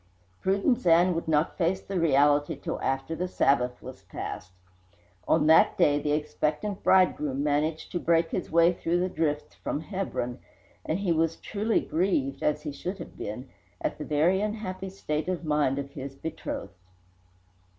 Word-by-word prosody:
Prudence 200 Hz, +5 st, +1 dB
Ann 175 Hz, +2 st, +5 dB
would 165 Hz, 0 st, -3 dB
not 155 Hz, +3 st, +1 dB
face 180 Hz, +2 st, +1 dB
the 195 Hz, -1 st, -3 dB
reality 145 Hz, -2 st, +3 dB
till -, -, -5 dB
after 135 Hz, +4 st, -1 dB
the 180 Hz, +2 st, -2 dB
Sabbath 125 Hz, -7 st, +1 dB
was 130 Hz, -6 st, -9 dB
past. 95 Hz, 0 st, -7 dB, 0.8 s
On 160 Hz, -2 st, +3 dB
that 160 Hz, +1 st, +5 dB
day 145 Hz, 0 st, +4 dB
the 150 Hz, 0 st, 0 dB
expectant 155 Hz, +6 st, -2 dB
bridegroom 150 Hz, -7 st, +3 dB
managed 150 Hz, +2 st, 0 dB
to 175 Hz, -, -1 dB
break 165 Hz, -1 st, +2 dB
his 180 Hz, -, -3 dB
way 170 Hz, +2 st, +5 dB
through 175 Hz, 0 st, 0 dB
the 185 Hz, +1 st, 0 dB
drifts 150 Hz, -4 st, -2 dB
from 150 Hz, -, -4 dB
Hebron, 165 Hz, -, -3 dB, 0.4 s
and 160 Hz, -, -1 dB
he 195 Hz, -3 st, 0 dB
was 165 Hz, 0 st, +1 dB
truly 215 Hz, +2 st, -1 dB
grieved, 155 Hz, -6 st, 0 dB
as 150 Hz, 0 st, 0 dB
he 150 Hz, -, -4 dB
should 180 Hz, +7 st, -5 dB
have -, -, -9 dB
been, 115 Hz, +6 st, -6 dB, 0.3 s
at -, -, -3 dB
the -, -, -3 dB
very 165 Hz, +6 st, +2 dB
unhappy 205 Hz, -3 st, -4 dB
state 155 Hz, -5 st, -3 dB
of 175 Hz, -2 st, -3 dB
mind 150 Hz, -3 st, +1 dB
of 140 Hz, 0 st, -4 dB
his 135 Hz, -1 st, -7 dB
betrothed. 135 Hz, -9 st, -6 dB
160 Hz, 165 wpm, -27 LUFS, 145-185 Hz, 0.8 s, Ann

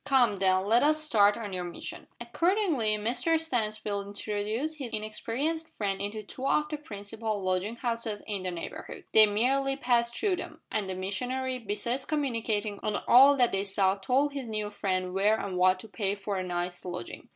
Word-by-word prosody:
Come, 245 Hz, -7 st, +3 dB
then, 185 Hz, 0 st, +2 dB
let 230 Hz, +4 st, +4 dB
us 310 Hz, +1 st, +3 dB
start 205 Hz, -8 st, +4 dB
on 210 Hz, -4 st, -5 dB
our 180 Hz, -, -2 dB
mission." 175 Hz, -1 st, -7 dB
Accordingly 285 Hz, -, +1 dB
Mr 245 Hz, +10 st, +1 dB
Stansfield 215 Hz, -8 st, -2 dB
introduced 215 Hz, +9 st, -3 dB
his 250 Hz, -4 st, -5 dB
inexperienced 250 Hz, +10 st, -3 dB
friend 195 Hz, -2 st, -1 dB
into 210 Hz, +2 st, -4 dB
two 260 Hz, +6 st, -5 dB
of 300 Hz, +1 st, +2 dB
the 300 Hz, -, -3 dB
principal 215 Hz, -4 st, -5 dB
lodging 185 Hz, +4 st, 0 dB
houses 230 Hz, -3 st, -3 dB
in 205 Hz, -3 st, -3 dB
that 185 Hz, -1 st, -3 dB
neighbourhood. 165 Hz, -, -7 dB
They 215 Hz, -1 st, +8 dB
merely 270 Hz, +6 st, +1 dB
passed 240 Hz, -3 st, +1 dB
through 400 Hz, -4 st, +1 dB
them, -, -, -7 dB
and 200 Hz, -3 st, -1 dB
the 185 Hz, -, -3 dB
missionary, 250 Hz, +7 st, -2 dB
besides 235 Hz, +4 st, -2 dB
commenting 230 Hz, -8 st, -1 dB
on 210 Hz, -1 st, -2 dB
all 275 Hz, +3 st, +8 dB
that 245 Hz, -2 st, +4 dB
they 195 Hz, 0 st, 0 dB
saw, 195 Hz, -1 st, +2 dB
told 255 Hz, +9 st, +1 dB
his 275 Hz, -4 st, -4 dB
new 215 Hz, -1 st, -3 dB
friend 185 Hz, -3 st, -1 dB
where 205 Hz, +3 st, +3 dB
and 195 Hz, -2 st, -4 dB
what 185 Hz, +1 st, +4 dB
to -, -, -11 dB
pay 200 Hz, -2 st, -2 dB
for 200 Hz, 0 st, -4 dB
a 185 Hz, -, -1 dB
night's 175 Hz, 0 st, -3 dB
lodging. 175 Hz, -9 st, -7 dB
215 Hz, 185 wpm, -29 LUFS, 200-255 Hz, -, They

